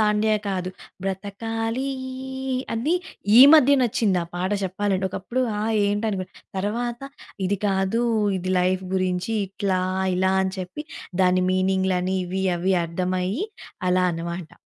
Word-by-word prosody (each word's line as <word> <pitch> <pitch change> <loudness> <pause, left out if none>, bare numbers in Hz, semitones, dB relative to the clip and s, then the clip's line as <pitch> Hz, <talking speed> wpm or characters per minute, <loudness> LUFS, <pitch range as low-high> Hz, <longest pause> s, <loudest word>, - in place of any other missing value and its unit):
దాండియా' 215 0 +2
కాదు. 185 -1 -2 0.3
'బ్రతకాలీ' 225 +6 -3 0.9
అది, 265 +10 +1 0.4
ఈ - - +11
మధ్య 285 -2 +6
నచ్చిందా 205 -6 +1
పాట 185 +2 -1
చెప్పాలంటే. 190 0 -1
ఒకప్పుడు 235 +7 -3 0.2
ఆ! - - -1 0.2
ఏంటి? 205 +2 0
అనుకునే. 190 -2 -4 0.3
తరవాత 235 +5 -2 0.5
ఇది 200 +2 0
కాదు 195 +4 +1 0.4
ఇది 185 +1 -2
లైఫ్ 185 +1 +1
గురించి. 185 +2 0 0.2
ఇట్లా, 190 -1 -1 0.4
ఇలా 190 +1 +2
అని 190 0 -1
చెప్పి, 185 +12 -6 0.4
దాని 185 0 +3
మీనింగ్‌లని, 190 0 +1
ఇవి 190 +2 -2
అవి 185 +2 +1
అర్థమయ్యి, 185 - -1 0.4
అలా 180 0 +3
అనమాట. 170 0 -5
190 Hz, 125 wpm, -24 LUFS, 185-215 Hz, 0.9 s, ఈ